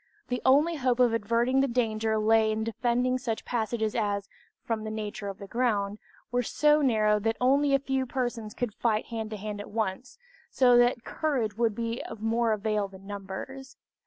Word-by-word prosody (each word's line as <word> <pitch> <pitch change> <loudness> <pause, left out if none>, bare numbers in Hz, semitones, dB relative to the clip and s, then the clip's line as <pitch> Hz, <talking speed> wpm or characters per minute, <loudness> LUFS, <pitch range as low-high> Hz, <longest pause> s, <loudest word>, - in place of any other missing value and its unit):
The 250 0 -2
only 300 +5 +4
hope 255 -2 +1
of 245 -2 +4
averting 235 +4 +1
the 275 - +3
danger 220 -3 0
lay 220 0 +3
in 215 0 -1
defending 245 +3 0
such 230 -4 -3
passages 220 -2 -1
as, 205 -3 -1 0.4
from 225 -2 -2
the 215 - -4
nature 210 -1 -5
of 195 -1 -5
the 200 - -9
ground, 210 -3 -1 0.3
were 245 0 +2
so 300 +5 +3
narrow 215 -5 +3
that 225 +2 -1
only 275 +2 +3
a - - +2
few 265 -1 -1
persons 240 -4 -3
could 245 -4 -2
fight 220 -1 0
hand 225 -2 -5
to 215 - -5
hand 205 0 -5
at - - -10
once, 220 - -3 0.3
so 250 -2 +4
that 245 0 +3
courage 255 -10 -1
would 230 -2 +1
be 230 +1 -3
of 225 - -8
more 225 +1 +1
avail 210 -1 0
than 195 0 -14
numbers. 205 +7 -7
230 Hz, 190 wpm, -28 LUFS, 215-250 Hz, 0.4 s, only